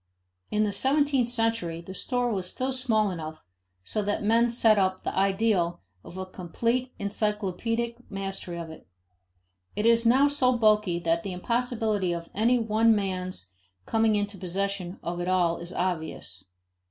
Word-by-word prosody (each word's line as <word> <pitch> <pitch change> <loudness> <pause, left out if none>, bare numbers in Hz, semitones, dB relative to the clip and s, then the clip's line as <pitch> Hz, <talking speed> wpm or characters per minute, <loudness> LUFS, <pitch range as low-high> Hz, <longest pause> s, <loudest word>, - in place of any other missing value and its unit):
In 210 0 +1
the 205 -1 0
seventeenth 275 -2 +2
century, 225 -8 0
the 170 +3 -9
store 245 +3 -1
was 185 -2 -3
still 260 +6 -2
small 225 -6 +1
enough 160 -2 -7 0.4
so 215 - -2
that 205 +1 -1
men 230 +3 +4
set 225 -3 +4
up 185 -1 0
the - - -3
ideal 195 -3 +1 0.2
of 180 - -11
a 190 - -4
complete 230 +8 -2
encyclopedic 210 +3 -2
mastery 195 -3 -4
of 165 -1 -6
it. 160 - -13 0.9
It 210 - -1
is 230 0 +5
now 260 +5 +5
so 255 -4 +2
bulky 210 -5 +3
that 170 -1 0
the 195 0 -5
impossibility 220 -2 0
of 170 0 -6
any 235 +5 +3
one 225 0 +3
man's 185 - -3 0.3
coming 220 -1 +2
into 205 -1 -2
possession 190 0 -2
of 175 +1 -3
it 175 - -3
all 180 -2 +2
is 170 +1 -9
obvious. 160 - -3
205 Hz, 155 wpm, -27 LUFS, 180-230 Hz, 0.9 s, is